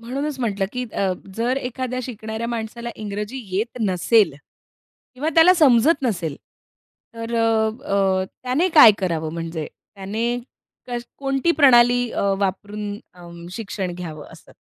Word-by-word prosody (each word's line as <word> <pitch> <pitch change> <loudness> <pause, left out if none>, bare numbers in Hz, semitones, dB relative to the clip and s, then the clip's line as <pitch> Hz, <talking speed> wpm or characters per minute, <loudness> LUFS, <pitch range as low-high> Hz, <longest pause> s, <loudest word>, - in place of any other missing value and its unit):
म्हणूनचं 270 +4 -4
म्हटलं, 200 -5 -1
की 250 0 -3
अ 190 -2 0 0.2
जर 245 +3 0
एखाद्या 255 -1 -3
शिकणाऱ्या 220 -1 -5
माणसाला 235 +1 -5
इंग्रजी 210 +4 -5 0.2
येत 230 +4 -2
नसेल. 205 0 +3 0.8
किंवा 285 +5 -2
त्याला 340 +3 +7
समजत 285 0 +4
नसेल 175 - -2 0.8
तर 230 +1 -5
अ 230 - +2 0.4
अ, 190 -4 +1 0.2
त्याने 270 +9 +1
काय 230 -8 +10
करावं 165 -4 -2
म्हणजे 165 -2 -4 0.3
त्याने 200 +4 -3 0.6
का 245 -1 -3 0.2
कोणती 275 +3 0
प्रणाली 245 -2 +5
अ, - - -2 0.2
वापरून 205 +1 -3
अंम, 170 -1 -12
शिक्षण 195 -5 -4
घ्यावं 160 -4 -7
असं? - - -16
225 Hz, 130 wpm, -22 LUFS, 190-250 Hz, 0.8 s, काय